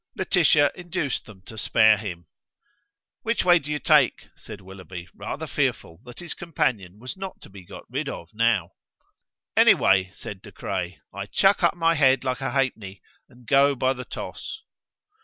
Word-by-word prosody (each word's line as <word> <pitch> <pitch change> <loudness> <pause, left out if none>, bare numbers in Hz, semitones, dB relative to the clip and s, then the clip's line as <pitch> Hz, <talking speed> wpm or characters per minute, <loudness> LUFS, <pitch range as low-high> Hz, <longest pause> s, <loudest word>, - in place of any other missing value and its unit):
Laetitia 160 -6 +3
induced 175 -6 -3
them 95 -4 -14
to 110 +2 -8
spare 110 +1 +5
him. 95 -5 -7 1.0
"Which 230 -3 0
way 175 -1 +6
do 150 -1 -7
you 150 - 0
take?" 150 -4 +3
said 110 -2 -10
Willoughby, 95 -2 -10
rather - - -5
fearful 80 0 -2
that 120 -1 -12
his 175 -3 -5
companion 110 - -2
was 125 +4 -7
not 190 -1 -7
to - - -13
be 95 -1 -12
got - - -11
rid - - -3
of 85 - -7
now. 115 +2 +1 0.8
"Any - - +7
way," 95 -1 +3
said 95 -2 -8
De 105 - -12
Craye. 90 -1 -4 0.2
"I 100 +1 -6
chuck 195 - +3
up 170 -1 +3
my 165 -1 +3
head 135 -4 +3
like 130 +1 -2
a 135 - -1
halfpenny, 120 -7 -2 0.3
and 120 0 -19
go 140 +3 +4
by 130 +1 +1
the 125 -1 -7
toss." 440 - -7
125 Hz, 175 wpm, -24 LUFS, 95-150 Hz, 1.0 s, Any